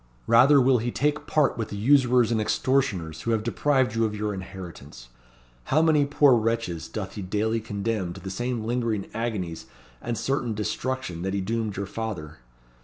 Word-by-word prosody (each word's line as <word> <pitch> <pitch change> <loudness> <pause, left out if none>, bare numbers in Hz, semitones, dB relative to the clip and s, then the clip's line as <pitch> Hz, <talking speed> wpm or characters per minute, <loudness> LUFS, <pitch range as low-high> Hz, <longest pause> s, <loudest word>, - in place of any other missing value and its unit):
Rather 130 +5 +6
will 130 -1 +4
he 120 +2 -2
take 150 +4 -1
part 145 -5 +2
with 110 - -2
the 100 - -5
usurers 125 0 +4
and 110 -2 +1
extortioners 105 - 0
who - - -3
have 110 -2 +1
deprived 130 0 +1
you 115 0 +1
of 105 -1 -1
your 105 0 -2
inheritance. 85 -10 -9 0.6
How 155 +3 +3
many 155 -3 +4
poor 145 -1 +5
wretches 115 -7 -1
doth 100 -3 -5
he 105 - -6
daily 105 +4 0
condemn 105 -3 -2
to 95 - -10
the 95 0 -6
same 120 +3 -2
lingering 115 -4 -1
agonies 105 -8 -3 0.3
and 120 -1 -3
certain 125 -5 -1
destruction 110 -3 -3
that 95 +2 -2
he - - 0
doomed 110 0 -2
your 100 - -2
father. 90 - -6
110 Hz, 180 wpm, -25 LUFS, 100-125 Hz, 0.6 s, Rather